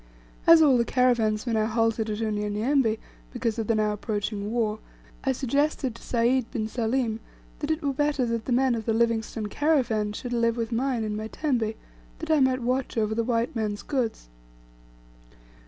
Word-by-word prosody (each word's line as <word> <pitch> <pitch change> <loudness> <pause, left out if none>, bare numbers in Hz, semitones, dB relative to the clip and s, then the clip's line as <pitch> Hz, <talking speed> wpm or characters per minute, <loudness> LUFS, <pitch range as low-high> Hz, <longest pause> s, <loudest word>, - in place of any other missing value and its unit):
As 330 -1 +9
all 270 -5 +5
the - - +4
caravans 235 -3 +2
were 235 - -1
now 215 -1 +2
halted 225 -1 0
at 210 +1 -3
Unyanyembe 215 +3 +1 0.3
because 235 -3 -2
of 220 - -2
the 230 - +2
now 215 -1 +1
approaching 210 -1 -3
war, 220 -2 0 0.4
I 270 - +2
suggested 275 0 0
to 230 - -14
Sayd 240 +1 +1
bin 220 -3 -2
Salim, 225 0 -1 0.4
that 295 - -3
it 315 +1 -1
were 280 -1 0
better 290 -1 +1
that 230 -1 -2
the - - -3
men 255 +1 +3
of 225 -2 -3
the 225 - +1
Livingstone 225 -1 0
caravan 235 -5 +1
should 245 +3 -5
live 230 0 +1
with 230 0 -2
mine 245 0 0
in 210 -1 -2
my 215 +1 -4
tembe, 235 -5 -1 0.4
that 320 0 -4
I 310 - +5
might 260 -2 +2
watch 250 0 -1
over 220 -1 +1
the 230 +1 0
white 235 +1 -1
man's 210 -2 -2
goods. 240 - -2
230 Hz, 185 wpm, -26 LUFS, 220-260 Hz, 0.4 s, As